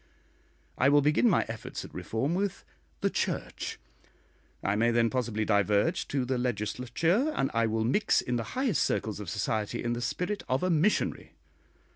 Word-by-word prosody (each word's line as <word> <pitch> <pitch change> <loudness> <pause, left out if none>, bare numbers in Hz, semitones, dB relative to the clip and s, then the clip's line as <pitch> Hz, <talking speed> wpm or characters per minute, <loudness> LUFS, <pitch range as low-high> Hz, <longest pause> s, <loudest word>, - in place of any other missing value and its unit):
I 130 - +5
will 145 0 +5
begin 150 - +4
my 185 - +3
efforts 115 -1 -6
at - - -13
reform 130 +8 -2
with 195 +1 -2 0.4
the - - +2
Church; - - -3 0.9
I 100 - +1
may 115 +3 +3
then 115 -1 +2
possibly 115 -4 -1
diverge 105 - +2
to 135 -3 -1
the 130 0 -1
Legislature, 125 - 0
and 135 - 0
I 115 0 +2
will 110 0 0
mix 170 - +3
in 125 - -2
the 115 - -4
highest 255 - +1
circles 110 -1 -1
of 100 -5 -6
society 105 +2 -2
in 120 - 0
the 120 - -3
spirit 180 - -2
of 130 +4 +1
a 185 - +2
missionary. 170 +6 +1
125 Hz, 170 wpm, -29 LUFS, 110-165 Hz, 0.9 s, I